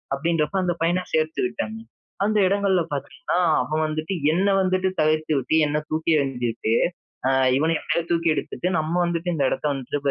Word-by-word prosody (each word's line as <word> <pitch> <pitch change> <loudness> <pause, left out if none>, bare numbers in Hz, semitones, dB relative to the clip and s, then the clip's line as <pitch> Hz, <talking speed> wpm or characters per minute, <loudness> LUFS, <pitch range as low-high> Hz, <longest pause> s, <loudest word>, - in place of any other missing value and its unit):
அப்படின்றப்ப 165 +3 -1
அந்த 175 -1 0
பையனை 175 +2 +1
சேர்த்துக்கிட்டாங்க. 220 - -1 0.5
அந்த 215 +1 +1
இடங்கள்ல 195 -2 +2
பாத்தீங்கனா 175 - -4 0.3
அவன் 155 +1 -1
வந்துட்டு 155 +4 -3 0.2
என்ன 190 +4 +1
வந்துட்டு 185 0 +1
தவிர்த்துட்டு 155 -1 +1
என்னை 150 +1 0
தூக்கி 160 +1 -2
எறிஞ்சுட்டு 120 -5 -1 0.5
அ - - +3 0.3
"இவனை 160 +3 +2
எப்போ - - 0
தூக்கி 170 -1 +1
எடுத்துட்டு 175 - -3
நம்ம 155 +1 -2
வந்துட்டு 170 0 -2
இந்த 140 - 0
இடத்தை 150 - -2
வந்துட்டு 135 +1 -3
160 Hz, 150 wpm, -23 LUFS, 150-185 Hz, 0.5 s, அ